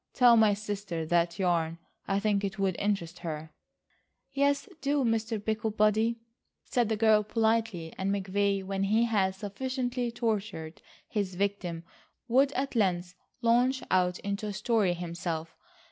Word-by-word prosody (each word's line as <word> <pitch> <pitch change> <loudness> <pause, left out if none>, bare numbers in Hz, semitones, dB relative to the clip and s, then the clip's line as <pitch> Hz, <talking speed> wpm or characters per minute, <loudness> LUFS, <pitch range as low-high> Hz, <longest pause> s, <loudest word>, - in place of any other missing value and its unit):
Tell 245 -2 +7
my 215 -2 +5
sister 200 -5 -4
that 170 +1 +1
yarn. 170 -3 +1 0.3
I 195 0 +1
think 205 -1 +1
it 200 +2 -3
would 195 -2 0
interest 185 -4 -1
her." 155 -1 -6 0.8
"Yes, 280 +4 +1
do, 280 0 +1
Mr. 225 -1 0
Picklebody," 220 +1 +1 0.5
said 240 -3 +1
the 220 - 0
girl 215 -1 +5
politely 220 -6 0
and 190 +1 0
McVay, 200 0 0
when 195 0 -1
he 220 +4 +3
had 200 -5 +1
sufficiently 245 +4 -3
tortured 205 -9 -3 0.3
his 200 -4 -2
victim, 185 -4 -2 0.4
would 270 +3 +4
at 275 +2 -2
length 180 -4 +1 0.3
launch 245 +3 +3
out 180 -1 +2
into 200 +2 -3
a 205 - -3
story 210 -3 +1
himself. 170 -2 -4
205 Hz, 140 wpm, -29 LUFS, 185-225 Hz, 0.8 s, Tell